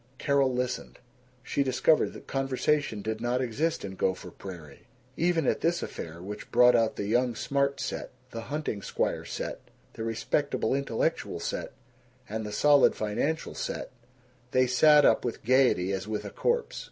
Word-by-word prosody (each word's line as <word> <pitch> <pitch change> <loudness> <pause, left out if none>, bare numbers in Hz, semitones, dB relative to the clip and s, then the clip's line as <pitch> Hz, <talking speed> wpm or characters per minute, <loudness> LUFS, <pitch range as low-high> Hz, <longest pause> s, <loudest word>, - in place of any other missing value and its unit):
Carol 140 -2 +2
listened. 125 0 -3 0.5
She 140 - -1
discovered 140 +4 +3
that - - -11
conversation 135 -4 0
did 110 +1 -3
not 120 +1 0
exist 130 +3 -1
in 95 - -6
Gopher 95 0 -2
Prairie. 85 -7 -11 0.3
Even 170 -2 +1
at - - +1
this 170 +1 +1
affair, 85 +1 -7
which 105 +2 -7
brought 125 +1 +6
out 115 -1 +2
the 100 - -3
young 120 +3 +1
smart 140 +3 0
set, - - -4 0.2
the 115 - -5
hunting 145 -8 -3
squire - - -2
set, - - -5 0.3
the 110 - -6
respectable 115 +7 0
intellectual 135 -4 -1
set, - - -4 0.5
and 110 0 -4
the 105 - -5
solid 145 +5 +5
financial 140 +10 -2
set, - - -4 0.6
they 130 +1 +3
sat 145 +4 +6
up - - +4
with 120 - -4
gaiety 125 -7 +3
as 95 +1 -3
with 110 -1 -3
a - - -6
corpse. 475 0 -1
125 Hz, 160 wpm, -28 LUFS, 110-140 Hz, 0.6 s, brought